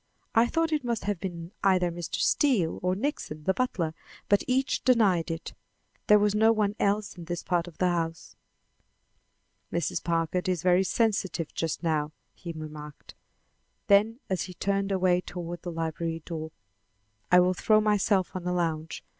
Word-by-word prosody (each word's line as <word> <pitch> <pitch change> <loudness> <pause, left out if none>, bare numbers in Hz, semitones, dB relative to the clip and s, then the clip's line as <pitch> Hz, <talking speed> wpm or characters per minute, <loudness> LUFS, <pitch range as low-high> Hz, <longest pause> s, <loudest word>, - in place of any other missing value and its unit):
I 230 +1 +5
thought 330 +4 0
it 300 -3 0
must 235 -2 -2
have 205 -3 -2
been 170 -2 -6
either 185 -3 +3
Mr. 170 -1 -5
Steele 230 - +2
or 180 +1 +1
Nixon, 195 - -3
the 190 - +2
butler, 185 -9 -1 0.4
but 205 - +4
each 260 +1 +1
denied 205 -10 +3
it. 165 0 -5 0.5
There 210 - +7
was 205 0 +2
no 220 +1 +5
one 210 -2 +1
else 205 0 0
in 175 -2 -9
this 175 0 -4
part 175 -1 0
of 170 - -12
the 185 - +1
house." 165 -2 -2 1.4
"Mrs. 170 - -1
Packard 170 +2 0
is 180 -4 -1
very 180 +1 +4
sensitive 190 -5 0
just 165 +1 -3
now," 155 -2 0 0.2
he 170 - -7
remarked. 150 -2 -9 0.8
Then 215 +4 +4
as 190 -2 -1
he 180 -1 -10
turned 195 +1 -1
away 185 -2 +2
toward 175 -1 -6
the 175 - -5
library 165 0 -3
door: 160 -2 -5 0.8
"I 180 - +8
will 180 +1 +4
throw 215 +3 +3
myself 205 -3 +1
on 180 -1 -4
a 180 - 0
lounge. 165 -2 -2
180 Hz, 165 wpm, -28 LUFS, 165-205 Hz, 1.4 s, I